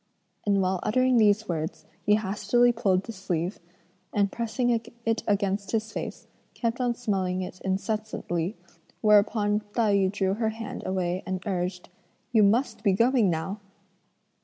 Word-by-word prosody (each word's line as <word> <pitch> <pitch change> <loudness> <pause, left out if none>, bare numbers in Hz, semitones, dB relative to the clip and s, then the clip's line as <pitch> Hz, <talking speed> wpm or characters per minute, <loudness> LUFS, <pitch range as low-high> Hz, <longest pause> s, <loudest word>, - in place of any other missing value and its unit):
and 200 -1 +3
while 185 0 0
uttering 255 +3 +3
these 215 0 +4
words, 160 -2 -3 0.2
he 210 - +6
hastily 215 +4 +2
pulled 200 -5 +1
the 230 - -7
sleeve, 185 -2 -3 0.5
and 200 -1 +1
pressing 240 +1 0 0.3
it 225 0 +1
against 200 0 0
his 220 -1 -1
face, - - -6 0.3
kept 235 +1 -1
on 245 -1 +1
smelling 190 -5 -1
it 185 0 -8
incessantly, 195 -2 -2 0.4
whereupon 210 0 +4 0.2
Tai 220 -4 +3
yü 195 -1 +3
drew 195 -2 0
her 220 +1 0
hand 225 0 -6
away 185 -1 -1
and 185 +1 -3
urged: 180 -2 -3 0.4
"You 225 -2 +5
must 220 +3 +2
be 200 -3 +4
going 230 0 +3
now!" 175 +5 -2
205 Hz, 145 wpm, -27 LUFS, 190-225 Hz, 0.5 s, he